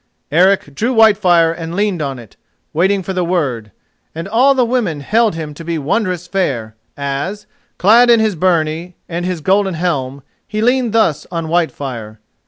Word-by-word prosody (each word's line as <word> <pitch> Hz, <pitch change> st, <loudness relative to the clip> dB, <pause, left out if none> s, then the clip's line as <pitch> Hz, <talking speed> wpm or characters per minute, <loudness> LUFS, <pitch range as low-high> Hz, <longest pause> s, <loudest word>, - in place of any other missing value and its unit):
Eric 180 Hz, -2 st, +3 dB
drew 235 Hz, -, -1 dB
Whitefire 190 Hz, -7 st, +4 dB
and 165 Hz, 0 st, -6 dB
leaned 200 Hz, -4 st, 0 dB
on 135 Hz, -3 st, -3 dB
it, 115 Hz, -4 st, -14 dB, 0.4 s
waiting 190 Hz, +4 st, +1 dB
for 190 Hz, -, -4 dB
the 180 Hz, -1 st, 0 dB
word, 135 Hz, -, -2 dB, 0.4 s
and 165 Hz, +3 st, -5 dB
all 255 Hz, +7 st, +3 dB
the 255 Hz, -2 st, +3 dB
women 225 Hz, -, -1 dB
held 220 Hz, +5 st, +1 dB
him 155 Hz, -2 st, -6 dB
to 165 Hz, -, -10 dB
be 165 Hz, 0 st, -3 dB
wondrous 180 Hz, +3 st, -1 dB
fair 130 Hz, -, -2 dB, 0.2 s
as, 145 Hz, +9 st, -4 dB, 0.3 s
clad 235 Hz, +6 st, +5 dB
in 235 Hz, -1 st, +6 dB
his 220 Hz, -1 st, +1 dB
byrnie 165 Hz, 0 st, 0 dB
and 175 Hz, +1 st, -3 dB
his 180 Hz, -3 st, -3 dB
golden 190 Hz, +2 st, +1 dB
helm, 140 Hz, -6 st, -2 dB, 0.2 s
he 215 Hz, -, -4 dB
leaned 245 Hz, +1 st, +2 dB
thus 170 Hz, -10 st, +1 dB
on 165 Hz, -2 st, -3 dB
Whitefire. 135 Hz, -10 st, -2 dB
175 Hz, 170 wpm, -16 LUFS, 155-205 Hz, 0.4 s, in